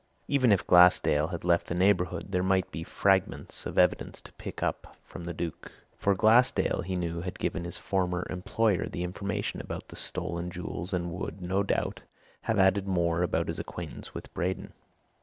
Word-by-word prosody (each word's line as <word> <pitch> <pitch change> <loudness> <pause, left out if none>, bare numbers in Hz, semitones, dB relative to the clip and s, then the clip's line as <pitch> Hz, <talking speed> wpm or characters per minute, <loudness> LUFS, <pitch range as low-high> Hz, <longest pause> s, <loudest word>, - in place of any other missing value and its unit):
Even 130 -5 +3
if 100 - +3
Glassdale 90 -4 +6
had 85 0 -5
left 85 -1 +2
the 85 - -2
neighbourhood, 90 -1 +1
there 90 -1 +1
might 95 0 +1
be 80 - -5
fragments 95 +2 +1
of - - -7
evidence - - +2
to - - -14
pick - - -7
up - - -3
from 85 - -9
the 85 - -3
Duke, 85 -1 -5 0.2
for 100 -1 +1
Glassdale, 115 +2 +4
he 95 +1 -3
knew, 85 -1 -2
had 90 +1 -5
given 85 - -2
his 85 - -6
former 90 -2 -1
employer 95 +2 0
the 85 - -4
information 95 +3 -3
about - - -7
the - - -10
stolen 85 +1 -2
jewels 90 +1 -5
and 85 -2 -1
would, 90 +1 -5
no 95 +2 0
doubt, 100 - -1 0.4
have 110 - +1
added 95 +1 +3
more 85 -2 +1
about 90 - 0
his - - -3
acquaintance - - -7
with - - -9
Braden. 90 +2 -3
90 Hz, 180 wpm, -29 LUFS, 85-95 Hz, 0.4 s, Glassdale